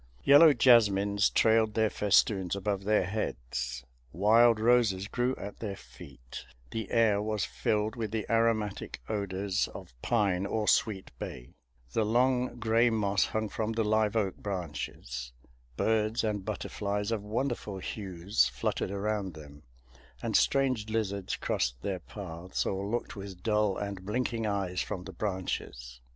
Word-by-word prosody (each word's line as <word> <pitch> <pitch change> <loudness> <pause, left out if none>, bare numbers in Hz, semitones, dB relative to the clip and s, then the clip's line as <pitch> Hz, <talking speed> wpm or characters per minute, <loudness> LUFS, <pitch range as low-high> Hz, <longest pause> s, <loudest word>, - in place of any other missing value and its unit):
Yellow 145 +3 +8
jasmines 105 -6 +4
trailed 110 -1 +3
their 110 -1 +2
festoons 100 -2 +2
above 100 0 -2
their 105 -1 +3
heads; 65 - -4 0.3
wild 110 +5 +5
roses 110 -5 +3
grew 125 +4 0
at 100 +1 -8
their 100 -3 -4
feet; 65 -8 -11 0.3
the 110 -3 -4
air 110 -3 +3
was 105 -1 -1
filled 105 +1 -1
with 115 -3 -3
the 110 0 -3
aromatic 115 -2 0
odors 100 -2 -1
of - - -10
pine 100 -5 +1
or 105 +1 -1
sweet 100 -4 +1
bay; - - -7 0.4
the 110 - +2
long 125 +3 +2
gray 115 +1 +3
moss 100 -3 +1
hung 110 0 -2
from 110 +1 -3
the 115 0 0
live 110 0 +1
oak 100 -4 0
branches; 75 -9 -5 0.4
birds 110 0 +1
and 105 -3 -2
butterflies 105 +1 -3
of 110 -3 -1
wonderful 110 -1 -3
hues 95 0 0
fluttered - - -2
around 100 -2 -2
them; 75 -1 -12 0.6
and - - -1
strange 130 -6 +2
lizards 100 -3 -2
crossed - - -1
their 95 -2 -2
paths, 90 -1 -5
or 95 +1 -2
looked 120 +3 -3
with 95 -3 -9
dull 105 -3 +1
and 100 -2 -5
blinking 115 +1 -1
eyes 95 -3 -1
from 90 - -4
the 95 +1 -9
branches. 85 - -4
105 Hz, 140 wpm, -30 LUFS, 95-110 Hz, 0.6 s, Yellow